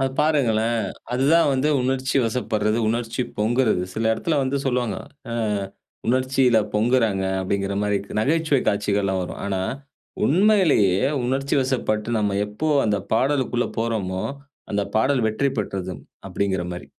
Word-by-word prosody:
அது 135 0 +1
பாருங்களேன், 120 -7 +2 0.3
அதுதான் 145 +7 +4
வந்து 135 +3 +1
உணர்ச்சிவசப்படுறது, 120 -4 0
உணர்ச்சி 115 +2 -2 0.2
பொங்குறது. 110 -2 +2
சில 110 - -2
இடத்தில 155 +6 0
வந்து 135 +1 -1
சொல்லுவாங்க. 125 -4 0 0.4
ஆ - - -2 0.7
உணர்ச்சியில 130 -1 +3 0.2
பொங்குறாங்க 110 -3 +2 0.2
அப்பிடிங்கிறமாரி 100 +2 -1 0.2
நகைச்சுவை 150 +1 +2
காட்சிகள்லாம் 100 -2 0
வரும். 90 - -6
ஆனா, 95 -2 -1 0.7
உண்மையிலேயே 165 - +4 0.2
உணர்ச்சிவசப்பட்டு 130 -4 0
நம்ம 100 -2 0
எப்போ 105 +10 -3 0.2
அந்த 105 -1 +1 0.2
பாடலுக்குள்ள 130 -1 +1
போறோமோ! 105 -5 -1 0.5
அந்த 100 0 +1
பாடல் 130 +1 +2
வெற்றி 125 +6 0
பெற்றது, 95 -3 -3 0.4
அப்பிடிங்கிறமாரி. 90 -3 -2
115 Hz, 110 wpm, -23 LUFS, 105-135 Hz, 0.7 s, அதுதான்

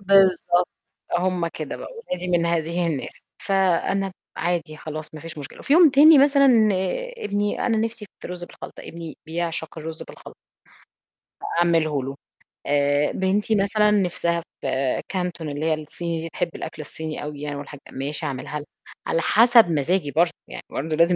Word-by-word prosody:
بالضبط 190 -2 +4 0.5
هُم 180 -2 0
كده 155 -3 -6
بقى، - - -8
ولادي 180 - -5
من 170 -1 +2
هذه 170 +1 0
الناس، 150 -5 -4 0.3
فأنا 195 0 +1 0.2
عادي 170 -2 -1
خلاص 155 0 -7
ما 155 - -8
فيش 165 -1 -8
مشكلة، 145 -1 -9
وفي 280 - -1
يوم 335 -1 +8
تاني 295 +3 +8
مثلًا 275 0 +6 0.7
ابني 205 - -1
أنا 230 -3 +2
نفسِي 225 -1 -2
في - - -8
رز 180 -1 -5
بالخلطة، - - -11
ابني 165 -1 -8
بيعشق 165 -1 -3
الرز 160 +1 -5
بالخلطة. - - -12 1.2
أعمله 160 -5 +2
له، 135 +1 -5 0.5
آآ، 145 0 +2
بنتي 200 +3 +1
مثلًا 210 +1 +3
نِفْسها 175 -4 +1 0.2
في - - -3 0.4
كانتون 180 -4 -3
اللي 145 +2 -3
هي 160 - +3
الصيني 165 +2 -4
دي 165 +1 -5
تحب 175 +3 -2
الأكل 155 - -6
الصيني 155 +1 -6
أوي 145 -1 -6
يعني 145 -1 -4
والحاج 145 0 -8
ماشي 145 +4 -3
أعملها 145 +1 -4
لها، 145 - -9 0.4
على 165 - +1
حسب 230 +3 +6
مزاجي 155 +1 +1
برضه 170 +3 +3 0.2
يعني - - -8
برضه 155 +3 -2
لازم 170 +2 +4
170 Hz, 160 wpm, -23 LUFS, 155-195 Hz, 1.2 s, يوم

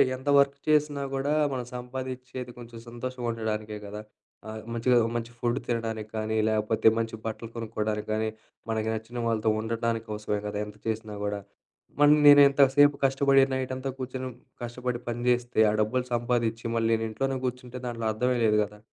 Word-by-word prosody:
ఎంత 130 +2 -12
వర్క్ 140 0 +3
చేసినా 150 -2 +2
కూడా 140 +2 0 0.2
మనం 125 -2 -3
సంపాదించేది 125 0 -6
కొంచెం 120 -1 -10
సంతోషంగా 120 +1 -5
ఉండడానికే 110 -1 -3
కదా! 105 +1 -7 0.5
ఆహ్, 110 0 -6
మంచిగా 120 +2 +3 0.2
మంచి 120 0 -3
ఫుడ్, 120 +2 0
తినడానికి 115 -2 -2
కానీ, 110 0 -1
లేకపోతే 110 0 +1
మంచి 115 -1 -2
బట్టలు 110 +1 -5
కొనుక్కోవడానికి 110 -2 -3
గానీ, 110 0 0 0.4
మనకి 110 0 -1
నచ్చిన 110 +2 -6
వాళ్ళతో 110 -1 +1
ఉండటానికి 115 0 -2
కోసమే 105 -1 -2
కదా! 105 0 -4
ఎంత 105 0 -11
చేసినా 110 -1 -3
గూడా. 105 0 -2 0.6
మళ్ళీ 145 +1 +7
నేను 145 0 +10
ఎంత 140 +1 +1
సేపు 145 0 +6
కష్టపడి 135 0 +4
నైటంతా 130 0 -2
కూర్చొని, 130 0 -4 0.3
కష్టపడి 120 0 -3
పని 120 0 -3
జేస్తే 120 -1 +1
ఆ - - +2
డబ్బులు 125 +4 +1
సంపాదించి 120 -1 0
మళ్ళీ 115 0 +1
నేను 115 0 0
ఇంట్లోనే 135 +5 -1
కూర్చుంటే 125 0 -5
దాంట్లో 115 -2 -4
అర్థమే 125 +3 +1
లేదు 105 -1 +4
గదా! 105 0 -9
120 Hz, 160 wpm, -27 LUFS, 110-130 Hz, 0.6 s, నేను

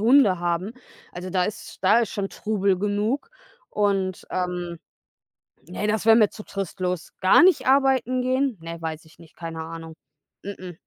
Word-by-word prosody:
Hunde 225 -5 +5
haben. 175 +4 -1 0.4
Also, 180 +1 -6
da 185 -1 +1
ist 205 - -6
da 225 - +6
ist 225 - -1
schon 195 -1 -3
Trubel 200 -3 0
genug 210 - -1 0.4
und, 195 -3 -1
ähm, 180 -2 -3 0.9
ne, 200 +3 -3
das 215 0 0
wär 225 0 +7
mir 215 -3 +5
zu 210 - -10
trostlos. 185 -3 -4
Gar 190 - +6
nicht 365 -7 +4
arbeiten 265 -2 +3
gehen? 260 -2 0
Ne, 165 0 -7
weiß 160 -1 -5
ich 160 +1 -21
nicht, 165 -2 -17
keine 165 -1 -6
Ahnung. 165 0 -8 0.5
Mh 200 0 -6
mh. 180 -1 -8
195 Hz, 165 wpm, -24 LUFS, 175-220 Hz, 0.9 s, wär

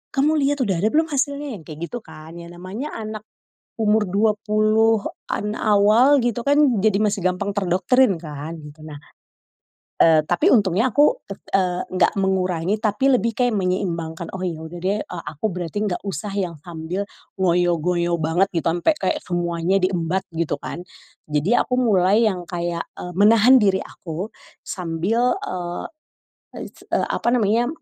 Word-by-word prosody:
Kamu 300 +3 +2
liat 285 -1 +1
udah 190 -7 0
ada 210 - +2
belum 315 +5 +1
hasilnya?" 285 +1 -1
Yang - - -15
kayak 155 -1 -9
gitu 240 - -4
kan, 155 -6 -13
ya 170 - -9
namanya 185 - -7
anak 215 -1 -6 0.6
umur 215 0 +3
20-an 215 +1 +1
awal 215 +7 +4
gitu 240 -1 -1
kan, 285 -6 +3
jadi 210 -2 +3
masih 205 -3 0
gampang 180 +2 0
terdoktrin 190 +2 +2
kan, 150 -1 -7
gitu. 150 +1 -13
Nah, 150 -2 -9 1.0
eee, 160 -1 +5
tapi 175 +3 +2
untungnya 210 +2 +2
aku 300 - +4
tek - - -9
eee, 180 -2 +1
nggak 185 0 +2
mengurangi 185 0 0
tapi 215 +5 +1
lebih 230 +2 -1
kayak 245 -2 +1
menyeimbangkan, 170 -3 -2
"Oh - - -8
ya 165 -3 -4
udah 160 +2 -8
deh, 200 +3 0
eee, 175 -2 -7
aku 160 +9 -2
berarti 180 +4 -3
nggak 175 - -3
usah 195 +1 -4
yang 180 -3 -1
sambil 175 +3 -5 0.4
ngoyo-ngoyo 175 -1 +1
banget 165 +5 +2
gitu, 165 -1 -1
ampe 175 - +2
kayak 190 - 0
semuanya 175 +1 0
di 185 - +2
embat 180 0 -1
gitu 165 -1 -1
kan." 175 - -6 0.5
Jadi 150 +11 +2
aku 250 - 0
mulai 205 0 +3
yang 180 -3 -5
kayak, 170 -1 -3 0.2
eee, 180 - -7
menahan 225 +5 +6
diri 190 -2 +2
aku 175 +5 -7 0.3
sambil, 190 +8 -1
eee, 175 -1 -4 0.8
is - - -17
eee, - - 0
apa - - -1
namanya, 235 +1 +2
190 Hz, 155 wpm, -22 LUFS, 175-220 Hz, 1.0 s, menahan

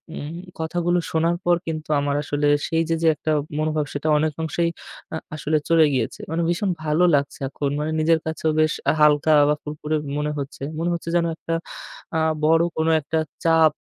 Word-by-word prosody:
উম 150 +3 -6 0.2
কথাগুলো 175 +2 0
শোনার 165 +2 +1
পর 175 0 +5
কিন্তু 155 -1 -4
আমার 140 0 0
আসলে 145 0 0 0.2
সেই 165 0 +1
যে 165 - +2
যে - - +4
একটা 155 +2 -2 0.3
মনোভাব 155 -1 0
সেটা 145 +2 -3
অনেক 155 0 0
অংশেই 170 +2 0 0.4
আ - - -1 0.2
আসলে 155 0 0
চলে 165 -1 +6
গিয়েছে। 130 - -1
মানে 165 +1 0
ভীষণ 175 +3 0 0.2
ভালো 155 +3 +2
লাগছে 140 0 -1
এখন 140 +1 -2
মানে 155 +1 -2
নিজের 160 +1 +3
কাছেও 160 0 -1
বেশ 155 -1 +2 0.2
আ - - 0
হালকা 150 +1 +5 0.2
বা 150 - +3
ফুরফুরে 150 +1 -3 0.2
মনে 150 0 -1
হচ্ছে। 140 -1 -6 0.2
মনে 170 +1 0
হচ্ছে 170 0 -4
যেনো 170 -1 +2
একটা 165 - -3 0.6
আ - - +2 0.3
বড় 165 +1 +4
কোনো 160 +1 +2
একটা 160 +3 -1 0.3
চাপ 160 -2 +5
155 Hz, 185 wpm, -23 LUFS, 150-165 Hz, 0.6 s, চলে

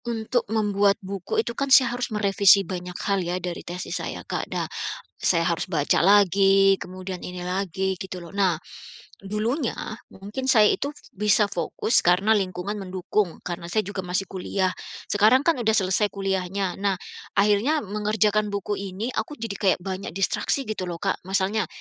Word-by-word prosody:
Untuk 230 0 -1
membuat 205 -2 +2
buku 195 +2 -3
itu 235 - -3
kan 275 +3 -2
saya 260 -2 +6
harus 245 0 -2
merevisi 200 -2 +4
banyak 180 0 -6
hal 200 -1 +1
ya 175 +1 -2
dari 180 -1 -5
tesis 180 +1 -5
saya, - - -6
Kak. - - -3
Nah, - - -2 0.6
saya 170 -2 +2
harus 170 +1 -1
baca 150 -5 +2
lagi 195 0 +5
kemudian 185 0 -7
ini 180 0 -6
lagi 190 0 -1
gitu 185 0 -7
loh. 170 +2 -11
Nah, 190 -5 +2 0.6
dulunya 220 +7 -1 0.3
mungkin 210 +7 -6
saya 220 -5 +6
itu 280 - -2 0.2
bisa 210 +1 +2
fokus 180 +6 0
karena 180 +5 +3
lingkungan 195 0 -1
mendukung 190 -1 -2
karena 170 -1 -5
saya 215 +5 +1
juga 205 0 -4
masih 180 +2 -1
kuliah, 190 0 -1 0.4
sekarang 215 +6 +5
kan 330 -4 +2
udah 220 -2 +1
selesai 200 +1 +2
kuliahnya. 195 -1 -2
Nah 200 0 +1 0.4
akhirnya 210 +10 +3
mengerjakan 210 0 0
buku 200 0 -2
ini 200 +4 -4
aku 235 +4 -3
jadi 225 -5 -5
kayak 195 -3 +2
banyak 190 -2 -5
distraksi 195 +8 0
gitu 215 -6 -4
loh, 175 -1 -4
Kak. - - 0
Masalnya, 195 +1 0
200 Hz, 160 wpm, -24 LUFS, 185-215 Hz, 0.6 s, saya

